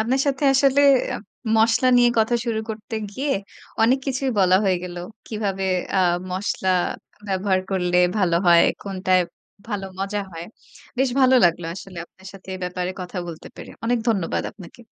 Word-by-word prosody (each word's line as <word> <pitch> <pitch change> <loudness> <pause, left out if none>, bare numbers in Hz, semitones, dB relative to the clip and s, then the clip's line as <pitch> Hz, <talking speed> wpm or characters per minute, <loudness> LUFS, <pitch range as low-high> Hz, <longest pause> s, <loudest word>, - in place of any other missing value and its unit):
আপনার 250 +5 +1
সাথে 280 0 0
আসলে 275 +1 +4 0.3
এপ - - -6 0.3
মসলা 225 +3 +3
নিয়ে 245 0 +6
কথা 225 +2 +2
শুরু 225 -2 -1
করতে 215 +1 -7 0.2
গিয়ে, 275 +7 -3 0.5
অনেক 250 +4 +4
কিছুই 265 0 -1
বলা 185 -1 +5
হয়ে 190 -2 +2
গেলো। 175 -1 -7 0.3
কিভাবে 200 -3 -3 0.3
আ - - +4 0.3
মশলা 190 0 -2 0.6
ব্যবহার 190 0 +1
করলে 180 -2 0 0.2
ভালো 175 -4 +2
হয়, 170 -1 +7 0.2
কোনটায় 185 -2 +1 0.5
ভালো 205 -3 -3
মজা 200 +1 -2
হয়। 165 0 -7 0.5
বেশ 265 -1 +2
ভালো 260 0 +5
লাগলো 170 0 +2
আসলে 190 -2 -9
আপনার 190 +2 -19
সাথে 195 -1 -15
এ - - -6
ব্যাপারে 180 0 -3
কথা 180 +1 -6
বলতে 165 -2 -9
পেরে। - - -10
অনেক 240 +1 +1
ধন্যবাদ 195 -7 0
আপনাকে। 190 +2 -14
195 Hz, 160 wpm, -22 LUFS, 185-235 Hz, 0.6 s, হয়